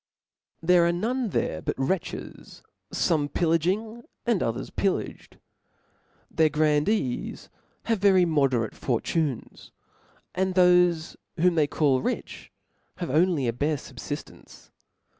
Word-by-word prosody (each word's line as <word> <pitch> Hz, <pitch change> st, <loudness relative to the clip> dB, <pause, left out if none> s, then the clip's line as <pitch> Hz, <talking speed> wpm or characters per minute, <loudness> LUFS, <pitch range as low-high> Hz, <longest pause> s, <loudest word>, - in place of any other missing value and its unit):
There 175 Hz, 0 st, +5 dB
are -, -, +3 dB
none 230 Hz, +7 st, -1 dB
there 80 Hz, -, -2 dB
but -, -, -2 dB
wretches, 150 Hz, +7 st, -4 dB, 0.3 s
fome 150 Hz, -3 st, +1 dB
pilr 165 Hz, -1 st, +2 dB
laging, 215 Hz, +8 st, -1 dB, 0.2 s
and 230 Hz, -6 st, +1 dB
others 115 Hz, -, -3 dB
pillaged. -, -, -3 dB, 0.9 s
Their 160 Hz, -1 st, +3 dB
grandees 150 Hz, -, 0 dB, 0.3 s
have 225 Hz, -3 st, 0 dB
Very 190 Hz, -2 st, +5 dB
moderate 135 Hz, -8 st, +1 dB
fortunes; 135 Hz, +2 st, -2 dB, 0.6 s
and 190 Hz, 0 st, -1 dB
thofe 180 Hz, -2 st, +4 dB, 0.2 s
whom 180 Hz, +2 st, +4 dB
they 155 Hz, -3 st, +2 dB
call 140 Hz, -4 st, +1 dB
rich, -, -, -4 dB, 0.4 s
have -, -, -4 dB
only 160 Hz, -3 st, +2 dB
a 115 Hz, -, 0 dB
bare 145 Hz, +5 st, 0 dB
fubfiftence. 140 Hz, +2 st, -9 dB
165 Hz, 115 wpm, -26 LUFS, 145-185 Hz, 0.9 s, There